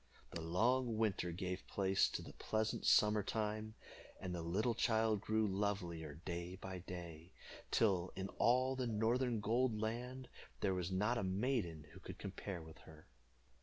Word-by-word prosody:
The 85 - -4
long 115 +8 +2
winter 105 -5 +1
gave 90 +1 -4
place 95 -1 +3
to - - -4
the - - -10
pleasant 110 0 -1
summer 105 0 +6
time, 110 +1 -2 0.4
and 90 -1 -4
the 85 - -2
little 100 +8 +1
child 110 -3 +2
grew 110 +1 +2
lovelier 90 -6 -2
day 85 0 -3
by 95 -1 -6
day, 85 -1 -8 0.4
till 95 -5 +3
in 95 0 -3
all 130 +2 +4
the 130 -2 -1
northern 115 +1 +1
gold 115 +1 +2
land 125 +4 -3 0.3
there 95 -2 +2
was 90 -1 -1
not 105 +6 +2
a - - -1
maiden 95 - 0
who - - -12
could - - -8
compare 95 -3 -5
with 80 0 -12
her. 80 0 -14
100 Hz, 160 wpm, -39 LUFS, 90-115 Hz, 0.4 s, summer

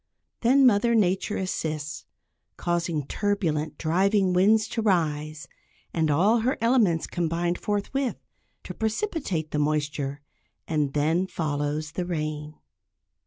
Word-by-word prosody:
Then 265 +3 +5
"Mother 235 0 +4
Nature" 195 0 +1
assists, 155 -5 -3 0.5
causing 170 -4 -1
turbulent, 165 -6 -1
driving 190 +3 +2
winds 210 +4 +4
to 230 - -2
rise, 155 -6 0 0.5
and 160 -2 +1
all 195 +11 +4
her 250 +4 0
elements 225 -8 +3
combine 170 0 -1
forthwith, 210 +8 -2 0.5
to - - -7
precipitate 220 - -2
the 150 - -1
moisture; 145 -1 -1 0.5
and 150 -3 0
then 160 +5 +1
follows 150 -2 -2
the 175 +2 -3
rain. 155 -2 -3
175 Hz, 115 wpm, -26 LUFS, 155-205 Hz, 0.5 s, Then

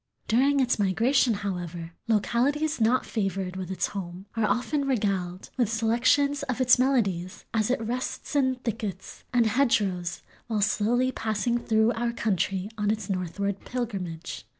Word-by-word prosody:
During 275 +5 +3
its 250 -4 +2
migration, 230 +5 +3
however, 175 -3 -4 0.2
localities 260 +7 +1
not 240 +4 +3
favored 195 -3 -2
with 185 -1 -5
its 190 - -1
home 185 -1 -6
are 225 -1 +2
often 280 +4 0
regaled 195 -7 -1
"with 240 -4 +1
selections 240 +6 +2
of 260 -3 -3
its 250 -1 +5
melodies 200 -9 0
as 220 -1 +1
it 255 - +1
rests 245 +6 -4
in 260 -2 +3
thickets 215 -6 -5
and 240 -2 +3
hedgerows 205 -8 +1 0.2
while 220 -3 0
slowly 240 +5 +2
passing 225 +1 -1
through 220 -1 +2
our 235 +1 -1
country 195 -3 0
on 205 0 +1
its 210 -2 -1
northward 195 +2 -2
pilgrimage." 190 -9 -5
220 Hz, 145 wpm, -27 LUFS, 195-250 Hz, 0.2 s, its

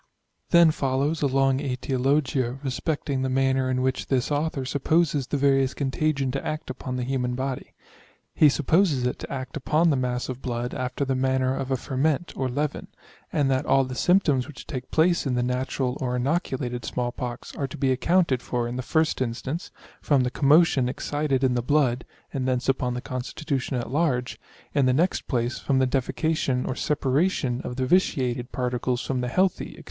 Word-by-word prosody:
Then 170 -2 +6
follows 140 +2 0
a 145 - +3
long 135 0 +2
aetiologia 130 -1 0
respecting 140 0 -2
the 130 - 0
manner 130 0 +1
in 130 0 0
which 130 0 -1
this 130 +1 0
author 145 -2 -1
supposes 145 0 +1
the 145 - -1
variolous 135 -1 +2
contagion 140 -1 0
to 135 - -3
act 155 -3 -4
upon 130 0 -5
the 125 - -2
human 125 -1 -1
body. 130 0 -4 0.6
He 150 - +6
supposes 150 -1 +2
it 125 - -1
to - - -7
act 130 -1 -5
upon 155 +3 +2
the - - +2
mass 125 0 -1
of 130 0 -6
blood 120 0 -3
after 130 +2 -2
the 135 - 0
manner 130 0 +1
of 135 -1 -4
a 130 - +1
ferment 145 +7 -1
or 130 -1 -1
leven, 145 +3 -2 0.4
and 140 -3 +1
that 130 0 0
all 135 - +4
the 130 0 -5
symptoms 145 -4 +2
which 150 -5 -10
take 130 -4 -6
place 170 -1 +2
in 125 - 0
the 125 - +1
natural 125 +1 -1
or 125 -1 -1
inoculated 125 -3 -1
small 120 -1 -2
pox 120 -1 -6
are 140 - -2
to - - -9
be 135 -1 +1
accounted 140 0 +2
for 120 -1 -2
in 120 +1 -4
the - - -1
1st 160 +3 +1
instance, 130 +7 -3 0.3
from 140 -4 +3
the 125 - -1
commotion 140 -2 +4
excited 140 0 -1
in 130 -1 +3
the 120 - 0
blood, 130 -2 +1 0.3
(and 130 -2 -1
thence 125 -1 0
upon 125 -2 +1
the 125 - -3
constitution 130 +1 -3
at 120 0 -4
large); 135 -5 0 0.3
in 140 -3 +3
the 130 - +3
next 170 +7 +1
place 120 -1 -1
from 135 - 0
the 130 - +4
defecation 135 0 0
or - - -1
separation 135 -2 0
of 125 - -5
the 130 0 -1
vitiated 130 -6 +1
particles 125 0 -1
from 130 -3 -2
the 125 - -2
healthy, 185 +9 0
&c. - - -14
130 Hz, 190 wpm, -25 LUFS, 125-145 Hz, 0.6 s, Then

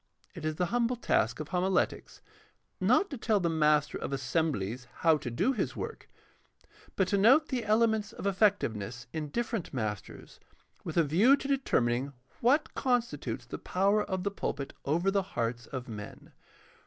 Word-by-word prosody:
It 165 -4 -7
is 155 0 -1
the 180 - 0
humble 245 0 +2
task 120 - +1
of 155 - -5
homiletics, 185 +1 -1 0.6
not 395 -3 +3
to 275 - -5
tell 220 -3 +2
the 170 -3 0
master 150 -2 +2
of - - -4
assem 140 +4 0
blies 120 +3 -4 0.2
how 160 -1 +7
to 130 - -5
do 120 - +1
his 240 - -2
work, - - -6 0.9
but 190 - +2
to 200 - +2
note 270 +10 +5
the 255 -3 -1
elements 220 0 +2
of 230 - -8
effective 200 - +2
ness 115 +4 -6
in 155 -2 -3
different 225 - -3
masters 105 -4 -5 0.4
with - - -5
a 170 - +6
view 200 - +5
to 275 - -6
determining 140 - +1 0.3
what 275 +6 +2
constitutes 245 -3 -1
the - - -7
power 200 +3 +2
of 185 -2 -3
the 200 - -1
pulpit 140 -7 -4
over 170 +7 +1
the 200 0 +2 0.2
hearts 120 0 -2
of 130 -2 -6
men. 105 -3 -9
180 Hz, 170 wpm, -30 LUFS, 135-220 Hz, 0.9 s, how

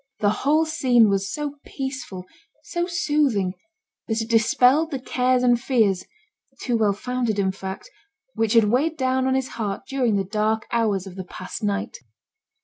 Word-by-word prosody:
The 205 -1 +3
whole 300 +8 +2
scene 250 -8 +3
was 195 -1 0
so 290 -1 -4
peaceful, 260 -9 -6 0.4
so 345 0 -2
soothing, 295 - +1 0.5
that 220 0 -1
it 225 +1 -3
dispelled 250 +7 +4
the 280 - -3
cares 255 0 +1
and 240 -1 +3
fears 205 -9 +1 0.5
(too 245 - -1
well 215 -3 +2
founded 240 0 -2
in 190 -1 +1
fact) 190 - -7 0.5
which 225 0 0
had 230 -1 +6
weighed 270 +10 +1
down 260 -1 +1
on 260 - +2
his 265 -1 -1
heart 205 -4 -4
during 255 -6 +1
the 195 - +1
dark 215 +2 -1
hours 215 -5 +1
of 190 -1 -10
the 185 - -5
past 185 +1 -8
night. 205 +2 -2
230 Hz, 165 wpm, -23 LUFS, 205-265 Hz, 0.5 s, had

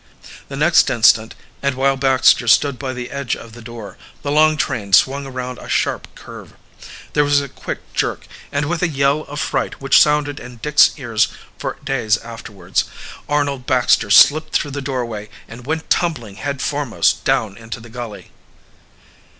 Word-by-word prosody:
The 140 - -7
next 155 +4 +4
instant, 115 -2 +3 0.3
and 140 -1 0
while 135 +1 +2
Baxter 130 -2 +3
stood 135 +3 +3
by 135 -2 -3
the 125 -1 -6
edge 140 -2 -2
of 115 -1 -12
the 120 - -11
door, 115 -4 -10 0.2
the 140 - -2
long 155 +1 +4
train 105 -6 -3
swung 135 +6 +4
around 125 -1 -6
a - - -11
sharp - - -1
curve. - - -12 0.6
There 150 - +3
was 145 0 +3
a 140 - -4
quick - - -7
jerk, - - -2 0.3
and 145 +1 -1
with 170 +3 -2
a 180 - +2
yell 140 -1 +1
of 145 +1 -7
fright - - -2
which 135 0 +5
sounded 150 -1 +2
in 125 -1 -11
Dick's 150 +5 +4
ears 115 -6 +1 0.3
for - - -4
days 125 -6 +1
afterward, 105 -5 -4 0.5
Arnold 140 -3 -1
Baxter 125 -4 +2
slipped 155 +9 +5
through 145 - 0
the 140 +1 -4
doorway 120 -6 -4 0.2
and 120 +2 -12
went 160 +1 -3
tumbling 120 - -1
head 140 -2 -4
foremost 145 -6 0
down 105 -3 0
into 115 +1 -8
the 115 +1 -13
gully! 115 -3 -8
135 Hz, 170 wpm, -19 LUFS, 115-145 Hz, 0.6 s, which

